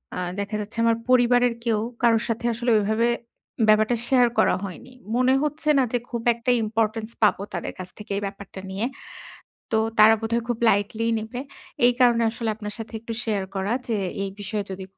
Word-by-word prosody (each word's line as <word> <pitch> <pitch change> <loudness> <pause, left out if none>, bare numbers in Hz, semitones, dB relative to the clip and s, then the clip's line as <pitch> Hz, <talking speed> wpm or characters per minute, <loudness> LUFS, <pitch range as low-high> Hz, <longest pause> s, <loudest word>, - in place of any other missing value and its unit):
আ - - -3 0.2
দেখা 200 +2 -3
যাচ্ছে 210 +2 -7
আমার 230 -1 +3
পরিবারের 245 -1 +4
কেউ, 225 -2 +2 0.2
কারো 230 -1 +5
সাথে 230 +1 -2
আসলে 240 +2 -2
ওইভাবে 220 +3 +1 0.6
ব্যাপারটা 215 +2 +4
শেয়ার 250 -2 +5
করা - - +4
হয়নি। 200 +6 -8 0.2
মনে 255 +1 +3
হচ্ছে 300 +1 -2
না - - +4
যে - - +3
খুব 235 -2 -3
একটা 235 +2 0
importance 220 +1 -1
পাবো 210 - +4
তাদের 175 - -4
কাছ 185 0 -6
থেকে 210 - -10
এই - - -2
ব্যাপারটা 195 -1 -9
নিয়ে। 200 +5 -2 0.9
তো - - +3 0.2
তারা 215 +1 +8
বোধহয় 230 +1 -1
খুব 240 -2 -1
lightly 210 +3 0
নিবে। 220 +3 -6 0.5
এই 245 - +5
কারণে 240 -2 +5
আসলে 230 0 -4
আপনার 210 -1 -6
সাথে 225 0 -8
একটু 230 0 -6
শেয়ার 205 -4 -1
করা 195 +3 -1 0.2
যে, 225 - +1 0.3
এই 195 - -4
বিষয়ে 205 0 -3
যদি 190 0 -6
225 Hz, 185 wpm, -24 LUFS, 210-240 Hz, 0.9 s, তারা